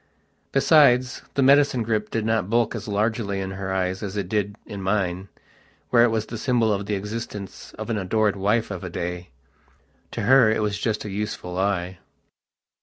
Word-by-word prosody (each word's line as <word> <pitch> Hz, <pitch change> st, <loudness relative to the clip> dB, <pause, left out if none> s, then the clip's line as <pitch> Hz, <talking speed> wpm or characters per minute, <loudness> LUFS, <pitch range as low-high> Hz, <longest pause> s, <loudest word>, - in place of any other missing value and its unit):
Besides, 130 Hz, -3 st, +4 dB
the 140 Hz, -, +3 dB
medicine 140 Hz, -2 st, +4 dB
grip 110 Hz, -1 st, -1 dB
did 115 Hz, -1 st, -2 dB
not 110 Hz, -4 st, 0 dB
bulk 115 Hz, 0 st, +2 dB
as -, -, -6 dB
largely 105 Hz, -1 st, -1 dB
in 95 Hz, 0 st, -4 dB
her 95 Hz, 0 st, -4 dB
eyes 95 Hz, 0 st, -1 dB
as 105 Hz, 0 st, -5 dB
it 100 Hz, -3 st, -2 dB
did 100 Hz, 0 st, -1 dB
in 100 Hz, -1 st, -7 dB
mine, 95 Hz, -1 st, -1 dB, 0.6 s
where 120 Hz, -1 st, +6 dB
it 120 Hz, -, +4 dB
was 110 Hz, -1 st, -1 dB
the 115 Hz, -1 st, -7 dB
symbol 115 Hz, -3 st, +2 dB
of 100 Hz, 0 st, -3 dB
the 105 Hz, -, 0 dB
existence 105 Hz, -1 st, -6 dB
of -, -, -6 dB
an 110 Hz, -, 0 dB
adored 105 Hz, +2 st, +1 dB
wife 105 Hz, +3 st, 0 dB
of 95 Hz, -2 st, -6 dB
a 90 Hz, -, -5 dB
day. 90 Hz, +1 st, -5 dB, 0.8 s
To -, -, -3 dB
her 125 Hz, 0 st, +6 dB
it 110 Hz, 0 st, +1 dB
was 105 Hz, -1 st, -1 dB
just 110 Hz, -1 st, -2 dB
a -, -, -4 dB
useful 100 Hz, -3 st, -4 dB
lie.... 95 Hz, -1 st, -1 dB
105 Hz, 185 wpm, -24 LUFS, 95-115 Hz, 0.8 s, where